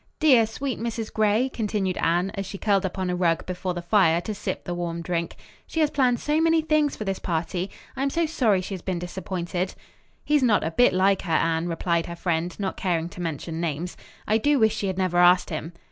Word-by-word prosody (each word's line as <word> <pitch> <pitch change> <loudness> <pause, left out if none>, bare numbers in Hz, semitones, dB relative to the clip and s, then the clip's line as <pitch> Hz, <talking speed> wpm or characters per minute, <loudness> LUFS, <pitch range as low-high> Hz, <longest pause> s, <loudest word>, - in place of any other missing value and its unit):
"Dear, 255 -8 +5
sweet 255 +4 -4
Mrs. 230 -1 -4
Gray," 215 +3 +2
continued 210 -6 -2
Anne, 175 +3 +1
as 195 -1 -4
she 195 - -6
curled 195 -2 +2
up 180 - -9
on 185 -1 -1
a - - -1
rug 170 -2 +1
before 180 0 -3
the 175 - -5
fire 170 -3 +4
to 215 - -4
sip 200 - -4
the 175 - -4
warm 170 -1 -3
drink, 170 -1 -2 0.3
"she 325 - -3
has 305 -2 +3
planned 250 -4 +2
so 300 +2 +1
many 325 0 +4
things 305 -2 +1
for - - -5
this 195 -2 -2
party. 175 +2 -2 0.3
I - - -4
am 275 - +2
so 335 +4 +1
sorry 235 - +2
she 190 - -6
has 185 - -5
been 185 0 -2
disappointed." 180 0 -4 0.5
"He's 295 -1 +3
not 230 -5 +3
a 160 - -1
bit 245 +9 +4
like 190 +1 +3
her, 175 - -5
Anne," 165 +1 +1
replied 170 0 0
her 170 - -6
friend, 170 +1 -2
not 195 -2 -3
caring 170 -3 -1
to 180 - -9
mention 165 0 -4
names. 170 +1 -3 0.3
"I 220 +1 +3
do 290 +5 +3
wish 220 -3 +3
she 200 - -2
had 190 -1 -2
never 185 -2 +1
asked 180 0 +5
him." 160 +1 -4
190 Hz, 230 wpm, -25 LUFS, 175-225 Hz, 0.5 s, Dear